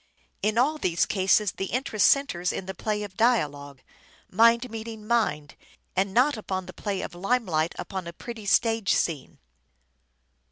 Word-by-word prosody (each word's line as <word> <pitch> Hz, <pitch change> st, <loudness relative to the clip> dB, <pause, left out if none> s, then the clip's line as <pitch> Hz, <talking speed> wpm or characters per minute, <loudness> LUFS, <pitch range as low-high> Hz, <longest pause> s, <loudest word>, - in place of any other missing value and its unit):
In 215 Hz, +1 st, 0 dB
all 295 Hz, +6 st, +2 dB
these 175 Hz, -, +1 dB
cases 195 Hz, 0 st, +2 dB
the 195 Hz, -, -4 dB
interest 235 Hz, -3 st, +1 dB
centres 180 Hz, -11 st, +2 dB
in 190 Hz, -, -5 dB
the 190 Hz, -, -5 dB
play 210 Hz, +2 st, -2 dB
of 200 Hz, -2 st, -9 dB
dialogue: 145 Hz, -, 0 dB, 0.5 s
mind 230 Hz, +4 st, +4 dB
meeting 220 Hz, -1 st, -7 dB
mind; 155 Hz, -11 st, 0 dB, 0.4 s
and 190 Hz, +1 st, +1 dB
not 250 Hz, +5 st, +3 dB
upon 190 Hz, -3 st, -4 dB
the -, -, -10 dB
play 200 Hz, -3 st, -3 dB
of -, -, -6 dB
lime 225 Hz, +7 st, 0 dB
light 160 Hz, -2 st, -1 dB
upon 190 Hz, -3 st, -5 dB
a 170 Hz, -, -7 dB
pretty 220 Hz, +2 st, -8 dB
stage 225 Hz, -1 st, +2 dB
scene. 155 Hz, -5 st, -2 dB
205 Hz, 160 wpm, -26 LUFS, 180-230 Hz, 0.5 s, mind